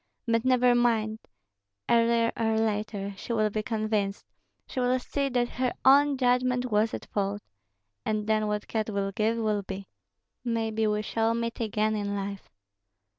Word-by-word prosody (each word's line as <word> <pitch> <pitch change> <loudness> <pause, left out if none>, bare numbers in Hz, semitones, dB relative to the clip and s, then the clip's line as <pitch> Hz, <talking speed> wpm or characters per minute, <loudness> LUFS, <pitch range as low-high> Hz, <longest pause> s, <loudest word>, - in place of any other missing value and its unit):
But 230 -1 +1
never 250 -1 +4
mind! 225 -3 +1 0.7
Earlier 230 0 +3
or 225 -1 +1
later 210 -2 -1
she 235 - -4
will 215 -2 +2
be 215 - -1
convinced, 215 -3 -1 0.4
she - - -5
will 250 0 +2
see 275 +2 -2
that 245 -1 +1
her 250 0 -1
own 280 +1 +6
judgment 250 -1 +1
was 215 +1 +2
at - - -8
fault. 205 0 -1 0.6
And 215 -1 -1
then 215 0 +1
what 210 0 -2
God 220 -1 -2
will 200 -1 -1
give 220 +3 0
will 215 -2 0
be. 195 0 -7 0.6
Maybe 225 -2 0
we 210 0 0
shall 225 +1 0
meet 230 0 -3
again 215 -1 0
in 205 -1 -2
life." 200 0 -5
220 Hz, 160 wpm, -28 LUFS, 210-240 Hz, 0.7 s, own